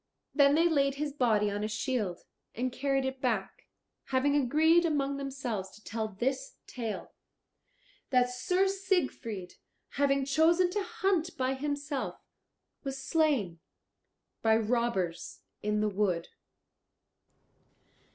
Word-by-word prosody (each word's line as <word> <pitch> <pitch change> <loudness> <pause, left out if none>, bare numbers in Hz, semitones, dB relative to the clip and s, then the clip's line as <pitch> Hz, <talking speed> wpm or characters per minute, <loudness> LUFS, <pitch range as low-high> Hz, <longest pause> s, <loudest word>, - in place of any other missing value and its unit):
Then 280 -1 +5
they 330 +2 +5
laid 275 -4 +2
his 290 0 -3
body 220 -7 +2
on 205 +1 -2
a - - 0
shield 215 -5 -2 0.3
and 255 +2 -1
carried 270 0 0
it 265 0 -4
back, 210 -7 -2 0.4
having 275 +2 +2
agreed 310 +5 +4
among 280 -4 0
themselves 260 -8 -4
to 215 - -17
tell 220 0 -3
this 260 +6 -2
tale, 230 -4 -5 1.0
that 250 -1 +4
Sir 360 +10 +1
Siegfried 350 - -2 0.3
having 275 -1 +1
chosen 330 +5 +3
to 410 +2 0
hunt 385 -5 -1
by 260 0 +1
himself 285 +1 -3 0.6
was 270 -1 -4
slain 270 - +1 0.8
by 220 -1 +4
robbers 220 -6 -1 0.2
in 210 0 0
the 215 - +2
wood. 190 -4 0
265 Hz, 120 wpm, -30 LUFS, 220-295 Hz, 1.0 s, Then